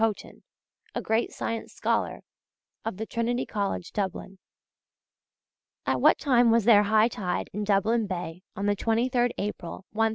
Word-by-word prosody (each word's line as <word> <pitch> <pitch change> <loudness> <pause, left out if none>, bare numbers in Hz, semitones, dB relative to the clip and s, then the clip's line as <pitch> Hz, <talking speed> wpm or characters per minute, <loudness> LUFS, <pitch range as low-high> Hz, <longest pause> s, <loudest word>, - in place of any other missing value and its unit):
Haughton, 225 -2 -1 0.5
a - - 0
great 225 +2 +1
science 230 0 -4
scholar, - - -1 0.6
of 225 -4 -4
Trinity 240 +2 -1
College, 200 -4 -3
Dublin: 195 -1 -4 1.5
At - - 0
what - - +6
time 245 -5 +4
was 230 0 +4
there 220 -3 +7
high 215 +2 +4
tide 190 -6 -3
in 210 +2 -2
Dublin 210 +2 +2
Bay 175 -2 -5
on 200 - -3
the 205 0 +2
23rd 240 +3 +1
April, 195 -2 -5
1014? 225 +1 +2
215 Hz, 140 wpm, -27 LUFS, 200-230 Hz, 1.5 s, there